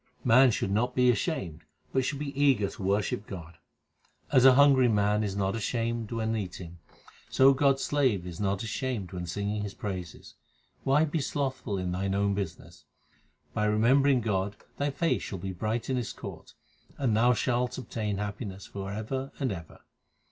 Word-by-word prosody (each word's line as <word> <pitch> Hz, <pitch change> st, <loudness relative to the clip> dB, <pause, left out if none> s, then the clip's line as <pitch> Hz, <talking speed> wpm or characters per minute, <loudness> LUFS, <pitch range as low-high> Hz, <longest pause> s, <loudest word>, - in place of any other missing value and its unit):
Man 125 Hz, +3 st, +6 dB
should 95 Hz, -4 st, -1 dB
not 120 Hz, +5 st, 0 dB
be 125 Hz, -1 st, +5 dB
ashamed, 90 Hz, -7 st, -3 dB, 0.3 s
but 130 Hz, -, +2 dB
should 140 Hz, +2 st, -2 dB
be 140 Hz, 0 st, -4 dB
eager 135 Hz, -7 st, +3 dB
to -, -, -9 dB
worship 100 Hz, +1 st, 0 dB
God: 85 Hz, -4 st, -9 dB, 0.7 s
As 130 Hz, -3 st, +5 dB
a 130 Hz, -1 st, +8 dB
hungry 135 Hz, -2 st, +6 dB
man 105 Hz, -1 st, +2 dB
is 100 Hz, -2 st, -2 dB
not 100 Hz, 0 st, 0 dB
ashamed 115 Hz, 0 st, -2 dB
when 115 Hz, -1 st, -1 dB
eating, 90 Hz, -4 st, -6 dB, 0.5 s
So 135 Hz, +1 st, +6 dB
God 135 Hz, 0 st, +3 dB
s 135 Hz, -, -5 dB
slave 130 Hz, -11 st, +1 dB
*s 90 Hz, -2 st, -7 dB
not 100 Hz, 0 st, -1 dB
ashamed 115 Hz, -3 st, -3 dB
to 90 Hz, -1 st, -5 dB
sing 100 Hz, +4 st, -2 dB
His 100 Hz, -1 st, -5 dB
praises. 90 Hz, -5 st, -6 dB, 0.5 s
Why 145 Hz, +4 st, +4 dB
be 160 Hz, +1 st, -2 dB
slothful 130 Hz, -7 st, -2 dB
in 90 Hz, -1 st, -2 dB
thine 95 Hz, +2 st, -1 dB
own 100 Hz, 0 st, +1 dB
business? 100 Hz, 0 st, -6 dB, 0.7 s
By 105 Hz, -, 0 dB
remembering 125 Hz, +5 st, +4 dB
God 100 Hz, -2 st, -1 dB, 0.2 s
thy 145 Hz, 0 st, +1 dB
face 165 Hz, +4 st, 0 dB
shall 95 Hz, -, -5 dB
be 95 Hz, +1 st, -5 dB
bright 110 Hz, +5 st, -2 dB
in 130 Hz, -, 0 dB
His 120 Hz, -, -3 dB
court, -, -, -10 dB, 0.4 s
and 125 Hz, -6 st, +1 dB
thou 120 Hz, +3 st, +4 dB
shalt 125 Hz, +1 st, 0 dB
obtain 110 Hz, -5 st, -3 dB
happiness 100 Hz, -1 st, -5 dB
for 100 Hz, -1 st, -6 dB
ever 130 Hz, +6 st, -4 dB
and 130 Hz, -4 st, 0 dB
ever. 85 Hz, -4 st, -8 dB
110 Hz, 175 wpm, -28 LUFS, 100-130 Hz, 0.7 s, a